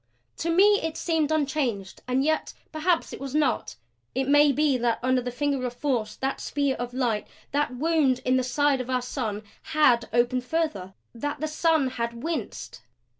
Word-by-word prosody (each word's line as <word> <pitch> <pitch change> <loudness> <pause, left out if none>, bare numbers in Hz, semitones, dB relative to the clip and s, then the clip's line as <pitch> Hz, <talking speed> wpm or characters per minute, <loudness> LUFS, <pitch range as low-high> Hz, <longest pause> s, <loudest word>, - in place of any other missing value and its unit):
To 335 - -2
me 405 +5 +5
it 320 0 -3
seemed 320 -3 0
unchanged 270 -10 -1
and 255 +1 +1
yet 315 +2 0 0.2
perhaps 330 +2 0
it - - -7
was 275 +1 -5
not. 290 - 0 0.4
It 265 0 0
may 290 +1 +6
be 290 0 +2
that 235 -1 +1
under 255 0 +2
that 245 0 -4
finger 275 +1 -1
of 245 - -7
force, 240 -7 -1
that 270 0 -3
spear 280 -2 0
of 245 0 -4
light, 235 -5 0 0.2
that 285 -3 0
wound 300 -2 +2
in 255 - +3
the 255 - +2
side 275 +2 +1
of 255 - -7
our 255 -1 0
sun 225 -5 -3 0.2
HAD 265 -7 +3
opened 240 +2 +2
further 250 - -2 0.2
That 290 +5 -4
the 310 - -1
sun 310 -2 +2
had 235 -2 -4
winced! 330 0 -4
270 Hz, 180 wpm, -26 LUFS, 245-305 Hz, 0.4 s, may